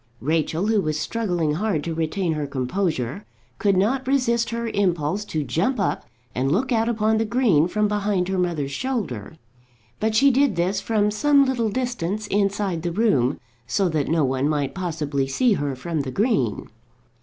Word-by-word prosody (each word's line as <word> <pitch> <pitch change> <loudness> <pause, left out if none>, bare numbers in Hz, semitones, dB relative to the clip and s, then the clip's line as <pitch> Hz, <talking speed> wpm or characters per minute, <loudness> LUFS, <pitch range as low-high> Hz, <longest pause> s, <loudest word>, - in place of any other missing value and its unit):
Rachel, 160 +5 0
who 215 -1 +2
was 155 -2 -2
struggling 175 -5 -1
hard 180 -3 -1
to 165 - -3
retain 165 +2 -1
her 150 -2 -3
composure, 140 - -2 0.4
could 200 -3 +2
not 250 +7 +1
resist 235 -4 +1
her 235 0 -3
impulse 185 -3 0
to 155 -6 -2
jump 200 - 0
up 195 - -1 0.3
and 135 +2 0
look 250 - 0
out 225 -1 +2
upon 220 -1 +1
the - - +2
green 215 - +3
from 210 +3 +1
behind 205 -3 0
her 190 -1 -1
mother's 165 -6 -1
shoulder. 165 - -3 0.6
But 220 0 0
she 275 +5 +5
did 265 -4 +2
this 185 +3 0
from 210 -2 +1
some 280 +6 +4
little 240 -4 0
distance 215 -4 -2
inside 200 -3 0
the 175 +1 -2
room, 155 - +2 0.3
so 185 +9 +1
that 155 -4 -1
no 160 -2 +2
one 135 +2 0
might 145 -3 -1
possibly 155 -7 -2
see 230 - +2
her 145 -6 -2
from 155 +4 -3
the 135 - -5
green. 140 - 0
190 Hz, 175 wpm, -23 LUFS, 155-220 Hz, 0.6 s, she